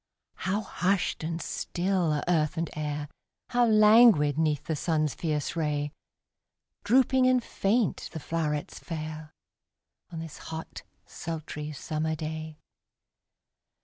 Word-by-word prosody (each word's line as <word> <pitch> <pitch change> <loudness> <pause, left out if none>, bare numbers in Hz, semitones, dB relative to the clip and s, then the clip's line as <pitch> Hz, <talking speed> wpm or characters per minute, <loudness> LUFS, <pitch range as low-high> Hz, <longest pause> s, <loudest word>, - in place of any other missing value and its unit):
How 195 +3 -1
hushed 190 -3 0
and 165 +1 -2
still 180 -1 -1
are 150 -1 0
earth 165 -1 +1
and 165 -1 -2
air, 150 -1 -3 0.4
How 245 -1 +3
languid 215 - +6
'neath 155 -2 +1
the 160 - -1
sun's 155 -1 0
fierce 150 -2 -2
ray 150 -2 -1 0.9
Drooping 260 +2 +4
and 255 -1 +3
faint 215 +1 0
the 160 - -5
flowrets 150 -2 -2
fair, 155 -1 -6 0.8
On 165 - -6
this 160 -2 -7
hot, 160 0 -7 0.2
sultry, 155 -2 -6
summer 155 +1 -2
day! 155 0 -5
160 Hz, 115 wpm, -28 LUFS, 155-190 Hz, 0.9 s, languid